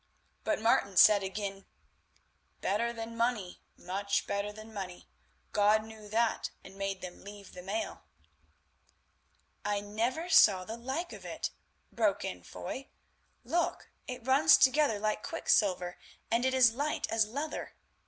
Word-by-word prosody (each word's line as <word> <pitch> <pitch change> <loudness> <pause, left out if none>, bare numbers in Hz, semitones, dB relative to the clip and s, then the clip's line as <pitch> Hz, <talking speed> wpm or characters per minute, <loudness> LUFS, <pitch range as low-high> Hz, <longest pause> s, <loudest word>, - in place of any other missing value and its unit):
But 315 - 0
Martin 205 -4 +2
said 210 +1 +8
again: 195 0 -5 0.9
"Better 230 +4 0
than 230 0 -6
money, 230 -6 -1 0.2
much 200 +3 -1
better 200 +1 -2
than 215 +1 -12
money. 185 -3 -7 0.4
God 210 +1 +4
knew 220 -1 -11
that 225 +2 +1
and 190 - -12
made 195 -1 -3
them 180 -1 -8
leave 200 0 -11
the 180 - -8
mail." 200 +5 -4 1.6
"I 205 0 0
never 230 +10 -2
saw 200 - +6
the 220 - -5
like 265 +9 -4
of - - -10
it," - - -4 0.4
broke - - +1
in - - -5
Foy; 270 +1 -7 0.6
"look, 330 +8 -1 0.2
it 250 -2 -6
runs 280 +5 +6
together 270 -4 +4
like 215 +1 -1
quicksilver 180 -5 +1 0.3
and 235 +2 +2
is 260 -3 +5
light 290 +5 -1
as 220 -1 +3
leather. 285 +7 -4
215 Hz, 135 wpm, -31 LUFS, 200-245 Hz, 1.6 s, said